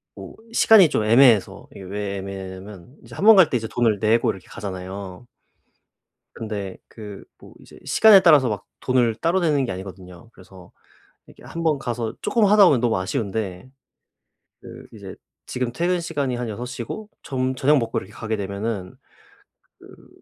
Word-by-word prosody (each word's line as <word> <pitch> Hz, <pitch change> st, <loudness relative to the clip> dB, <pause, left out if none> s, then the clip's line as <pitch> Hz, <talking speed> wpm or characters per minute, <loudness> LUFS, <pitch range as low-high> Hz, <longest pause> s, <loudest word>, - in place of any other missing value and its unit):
뭐 -, -, -11 dB, 0.2 s
시간이 210 Hz, -8 st, +6 dB
좀 110 Hz, -, -1 dB
애매해서 115 Hz, -2 st, +4 dB
이게 -, -, -12 dB
왜 100 Hz, +1 st, -5 dB
애매하냐면 95 Hz, +3 st, -9 dB
이제 -, -, -13 dB
1 200 Hz, -, -3 dB
번 220 Hz, 0 st, +9 dB
갈 185 Hz, -6 st, +6 dB
때 130 Hz, -, 0 dB
이제 110 Hz, -1 st, -5 dB
돈을 115 Hz, -2 st, 0 dB
내고 110 Hz, +3 st, +2 dB
이렇게 95 Hz, -, -5 dB
가잖아요. 95 Hz, +1 st, -8 dB, 1.1 s
근데 100 Hz, -4 st, -6 dB
그 105 Hz, -3 st, -11 dB
뭐 -, -, -16 dB
이제 -, -, -17 dB
시간에 215 Hz, -3 st, +6 dB
따라서 150 Hz, -8 st, +5 dB
막 105 Hz, -3 st, -5 dB
돈을 125 Hz, -3 st, +1 dB
따로 170 Hz, +8 st, 0 dB
내는 150 Hz, -5 st, +1 dB
게 120 Hz, -, -4 dB
아니거든요. 95 Hz, +2 st, -11 dB
그래서 90 Hz, -2 st, -17 dB, 0.6 s
이렇게 -, -, -18 dB
1 170 Hz, -, -7 dB
번 155 Hz, -3 st, +1 dB
가서 120 Hz, -3 st, -4 dB
쪼끔 230 Hz, -5 st, +1 dB
하다 205 Hz, 0 st, +6 dB
보면 145 Hz, -8 st, +4 dB
너무 120 Hz, -4 st, +1 dB
아쉬운데 100 Hz, 0 st, -4 dB, 0.9 s
그 -, -, -12 dB
이제 -, -, -10 dB, 0.3 s
지금 125 Hz, -1 st, -3 dB
퇴근 175 Hz, +7 st, -1 dB
시간이 145 Hz, -7 st, -3 dB
한 120 Hz, -1 st, -4 dB
6 115 Hz, +3 st, -6 dB
시고 130 Hz, -, -7 dB
좀 130 Hz, -1 st, -3 dB
저녁 145 Hz, +3 st, +3 dB
먹고 115 Hz, -2 st, -3 dB
이렇게 95 Hz, +3 st, -14 dB
가게 110 Hz, 0 st, -4 dB
되면은 100 Hz, -1 st, -5 dB, 0.9 s
그 -, -, -17 dB
115 Hz, 320 characters per minute, -22 LUFS, 100-140 Hz, 1.1 s, 번